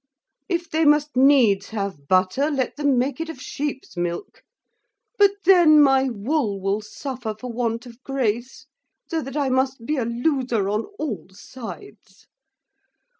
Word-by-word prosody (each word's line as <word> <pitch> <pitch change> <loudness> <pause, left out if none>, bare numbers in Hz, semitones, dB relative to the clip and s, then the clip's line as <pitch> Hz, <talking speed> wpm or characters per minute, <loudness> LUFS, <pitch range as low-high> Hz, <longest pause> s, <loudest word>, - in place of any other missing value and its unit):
If 345 -2 -1
they 320 0 0
must 295 -1 +3
needs 250 -7 +4
have 195 -9 -5
butter, 185 - +2
let 270 -4 -1
them 285 -3 +1
make 255 +4 -1
it 330 - -4
of 320 - -8
sheep's 280 0 -5
milk; 175 -1 -4 0.8
but 405 -1 +7 0.2
then 345 -5 +7
my 270 -2 +4
wool 230 -2 -1
will 195 +2 -1
suffer 230 +1 -6
for 250 +1 -6
want 230 0 -2
of 240 0 -13
grace; 260 +2 -2 0.4
so 325 -2 -2
that 270 +1 -6
I 280 -2 +1
must 260 -2 0
be 300 +3 -1
a 245 - 0
loser 240 -4 0
on 210 +2 -1
all 275 -13 -4
sides. 260 - -11
260 Hz, 150 wpm, -23 LUFS, 220-295 Hz, 0.8 s, but